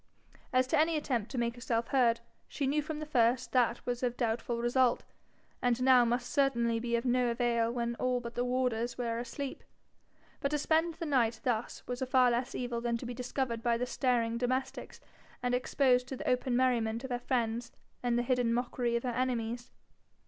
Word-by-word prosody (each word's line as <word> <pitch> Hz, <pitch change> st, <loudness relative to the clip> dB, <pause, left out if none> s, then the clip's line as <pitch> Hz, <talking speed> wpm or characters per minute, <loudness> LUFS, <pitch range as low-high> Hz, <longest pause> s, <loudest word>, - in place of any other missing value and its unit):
As 255 Hz, 0 st, +3 dB
to 265 Hz, -, +1 dB
any 320 Hz, +1 st, +3 dB
attempt 245 Hz, -8 st, -1 dB
to 265 Hz, -, -6 dB
make 235 Hz, -1 st, 0 dB
herself 235 Hz, -1 st, -2 dB
heard, 235 Hz, -4 st, +3 dB, 0.3 s
she 285 Hz, -, -3 dB
knew 290 Hz, +3 st, +1 dB
from 305 Hz, +1 st, -5 dB
the 305 Hz, -, -5 dB
first 250 Hz, -4 st, +2 dB
that 245 Hz, -2 st, +1 dB
was 245 Hz, -1 st, -2 dB
of 245 Hz, -1 st, -1 dB
doubtful 235 Hz, 0 st, -1 dB
result, 240 Hz, +1 st, +2 dB, 0.6 s
and 245 Hz, 0 st, +1 dB
now 255 Hz, -1 st, +7 dB
must 240 Hz, +1 st, 0 dB
certainly 235 Hz, -5 st, +2 dB
be 235 Hz, 0 st, -1 dB
of 235 Hz, +2 st, -1 dB
no 250 Hz, 0 st, +2 dB
avail 235 Hz, -1 st, +1 dB
when 235 Hz, -1 st, -2 dB
all 255 Hz, -1 st, +1 dB
but 235 Hz, -1 st, -7 dB
the 245 Hz, -, -1 dB
warders 245 Hz, -2 st, -1 dB
were 235 Hz, -2 st, -2 dB
asleep. 260 Hz, +3 st, -5 dB, 0.8 s
But 280 Hz, -, 0 dB
to 300 Hz, -, 0 dB
spend 320 Hz, +3 st, +1 dB
the 335 Hz, -, -5 dB
night 235 Hz, -6 st, +1 dB
thus 240 Hz, -2 st, -2 dB
was 245 Hz, 0 st, -5 dB
a 260 Hz, -, -1 dB
far 255 Hz, -1 st, +4 dB
less 240 Hz, +1 st, -1 dB
evil 240 Hz, -2 st, -3 dB
than 235 Hz, -1 st, 0 dB
to 240 Hz, -, -8 dB
be 245 Hz, -, -4 dB
discovered 250 Hz, -1 st, -3 dB
by 235 Hz, 0 st, +1 dB
the 250 Hz, -, -1 dB
staring 235 Hz, -2 st, 0 dB
domestics, 255 Hz, +2 st, -2 dB, 0.4 s
and 245 Hz, 0 st, 0 dB
exposed 250 Hz, 0 st, +2 dB
to 265 Hz, -, -5 dB
the -, -, -6 dB
open 250 Hz, 0 st, +1 dB
merriment 235 Hz, -2 st, +1 dB
of 265 Hz, -, -6 dB
her 245 Hz, -, -1 dB
friends, 235 Hz, -2 st, -1 dB, 0.3 s
and 240 Hz, -1 st, +1 dB
the 240 Hz, -, +1 dB
hidden 245 Hz, -2 st, +1 dB
mockery 245 Hz, -1 st, -1 dB
of 235 Hz, -, -1 dB
her 255 Hz, -, -1 dB
enemies. 240 Hz, -1 st, -2 dB
245 Hz, 200 wpm, -31 LUFS, 235-255 Hz, 0.8 s, now